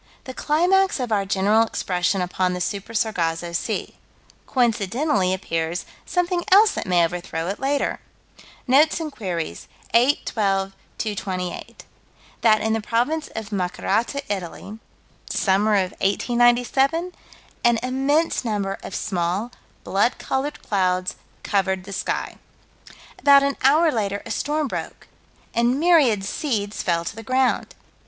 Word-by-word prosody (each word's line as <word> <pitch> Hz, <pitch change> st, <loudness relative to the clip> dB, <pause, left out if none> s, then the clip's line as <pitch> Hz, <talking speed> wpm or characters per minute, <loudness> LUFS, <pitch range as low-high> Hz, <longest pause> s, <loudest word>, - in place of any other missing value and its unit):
The 260 Hz, -, -8 dB
climax 360 Hz, +6 st, +2 dB
of 245 Hz, -3 st, -3 dB
our 200 Hz, -2 st, +1 dB
general 200 Hz, +3 st, +3 dB
expression 185 Hz, -4 st, 0 dB
upon 180 Hz, 0 st, -1 dB
the 180 Hz, -, -3 dB
Super 200 Hz, +4 st, -4 dB
Sargasso 170 Hz, -6 st, -1 dB
Sea. 170 Hz, -, -3 dB, 0.5 s
Coincidentally 230 Hz, -3 st, +1 dB
appears 165 Hz, -2 st, -2 dB, 0.2 s
something 355 Hz, -1 st, 0 dB
else 410 Hz, +3 st, +7 dB
that -, -, -4 dB
may 175 Hz, -2 st, +4 dB
overthrow 175 Hz, -1 st, -4 dB
it 200 Hz, -, -4 dB
later. 275 Hz, +1 st, 0 dB, 0.7 s
Notes 295 Hz, +6 st, +4 dB
and 315 Hz, -2 st, -4 dB
Queries, 170 Hz, -, -5 dB, 0.3 s
8 250 Hz, +5 st, +3 dB
12 195 Hz, -2 st, 0 dB, 0.2 s
228: 185 Hz, -4 st, -4 dB, 0.6 s
That 215 Hz, -2 st, +4 dB
in 220 Hz, 0 st, 0 dB
the 225 Hz, -, 0 dB
province 245 Hz, +9 st, 0 dB
of 220 Hz, -1 st, -5 dB
Macerata, 210 Hz, +8 st, -1 dB
Italy 200 Hz, +2 st, -5 dB, 0.5 s
(summer 205 Hz, +2 st, +2 dB
of 190 Hz, -2 st, +1 dB
1897?) 245 Hz, -, +2 dB, 0.5 s
an 235 Hz, -1 st, +4 dB
immense 270 Hz, +6 st, +1 dB
number 205 Hz, -4 st, -2 dB
of -, -, -7 dB
small, 185 Hz, +4 st, -2 dB, 0.3 s
blood 205 Hz, +5 st, +1 dB
colored 280 Hz, +3 st, -3 dB
clouds 185 Hz, -2 st, 0 dB, 0.3 s
covered 190 Hz, -2 st, 0 dB
the 200 Hz, +1 st, -8 dB
sky. -, -, -3 dB, 0.8 s
About 280 Hz, -1 st, +6 dB
an 280 Hz, 0 st, 0 dB
hour 305 Hz, +5 st, +5 dB
later 205 Hz, -4 st, -2 dB
a -, -, -6 dB
storm 300 Hz, 0 st, -1 dB
broke, -, -, -6 dB, 0.5 s
and 240 Hz, +3 st, +2 dB
myriad 295 Hz, -, +4 dB
seeds 210 Hz, -4 st, -2 dB
fell 170 Hz, -1 st, 0 dB
to 200 Hz, -, -5 dB
the 225 Hz, -, -7 dB
ground. 255 Hz, +2 st, 0 dB
215 Hz, 130 wpm, -23 LUFS, 190-270 Hz, 0.8 s, else